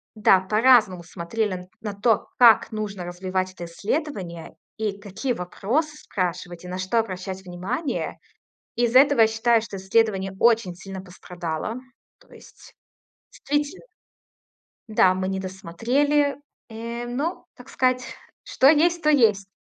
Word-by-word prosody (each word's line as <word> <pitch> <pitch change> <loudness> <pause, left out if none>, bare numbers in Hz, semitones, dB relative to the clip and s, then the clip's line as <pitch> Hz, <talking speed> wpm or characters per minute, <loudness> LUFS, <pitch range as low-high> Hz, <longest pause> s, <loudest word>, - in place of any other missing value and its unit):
да, 205 -3 +5
по-разному 215 -3 +4
смотрели 185 +5 -3
н 180 0 -9
на 210 -2 -4
то, 210 +2 +1
как 235 -3 +6
нужно 205 -4 -5
развивать 185 +1 -3
это 175 - -8
исследование, 185 - -4 0.2
и 210 -2 -3
какие 210 +6 -3
вопросы 255 - -2
спрашивать, 180 - -4
и - - -7
на 180 +1 -5
что 185 +5 -1
обращать 190 -2 -4
внимание. 185 - -4 0.6
Из-за 240 +1 +3
этого 280 -4 +4
я 220 - +7
считаю, 225 +1 +2
что 205 -3 -7
исследование 195 -1 +1
очень 230 -6 +3
сильно 195 +1 -8
пострадало. 180 +1 -6 0.4
То - - -21
есть - - -16 0.6
действительно 290 - -3 1.0
Да, 190 -4 +4
мы 185 0 -2
не 190 0 -2
досмотрели. 245 +11 0 0.3
Э, 235 +2 -6
ну, 295 +9 -3
так 250 +2 -14
сказать, 255 -1 +1 0.4
что 265 - +3
есть, 335 +3 +3
то 305 - +2
есть. 215 -9 +3
210 Hz, 135 wpm, -24 LUFS, 185-245 Hz, 1.0 s, я